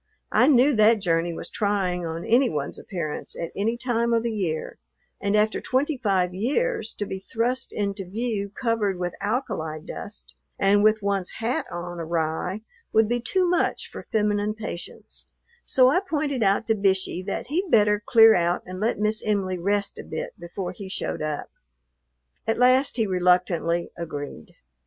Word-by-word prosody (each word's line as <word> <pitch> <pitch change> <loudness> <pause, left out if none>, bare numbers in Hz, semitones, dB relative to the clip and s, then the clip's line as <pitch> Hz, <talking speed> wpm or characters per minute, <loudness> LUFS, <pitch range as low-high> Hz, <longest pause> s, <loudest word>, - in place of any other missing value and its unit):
I - - +5
knew 280 0 +5
that 215 +1 +5
journey 170 -2 +1
was 165 - -7
trying 185 -4 0
on 165 +1 -5
any 250 +3 +4
one's 145 -2 -4
appearance 170 -7 -5
at 170 - -4
any 225 +4 0
time 235 -1 0
of 230 -1 +2
the 235 - -1
year, 180 -7 -3 0.4
and 200 +1 +1
after 215 +1 +2
twenty 285 +4 0
five 195 -8 +1
years 275 - -1
to 205 - -3
be 190 -1 -5
thrust 235 +6 -2
into 200 -1 -2
view 215 -1 -2
covered 210 -3 -1
with 180 -1 -3
alkali 205 - -2
dust 205 +6 -8 0.2
and 205 +1 +4
with 215 0 +4
one's 200 -2 0
hat 230 +2 -1
on 175 0 -5
awry 165 +4 -2 0.3
would 220 0 +4
be 240 +2 0
too 365 +10 +1
much 350 0 +1
for - - -9
feminine 210 -1 +1
patience; 215 -5 -8 0.4
so 255 -1 +4
I 360 - +4
pointed 300 -8 -2
out 200 +2 +2
to 225 - +3
Bishey 190 -2 0
that 200 - -3
he'd 360 +6 -1
better 210 -3 +4
clear 225 0 +7
out 175 -1 +1
and 185 0 -7
let 220 +4 0
Miss 215 +1 0
Em'ly 195 -4 0
rest 200 +3 -1
a - - -6
bit - - -5
before 175 +2 -5
he 200 -4 -9
showed 190 - -2
up. 155 -1 -3 1.0
At 225 - +1
last 255 +2 +4
he 225 - +2
reluctantly 180 -2 +1
agreed. 145 - -7
205 Hz, 170 wpm, -25 LUFS, 180-230 Hz, 1.0 s, clear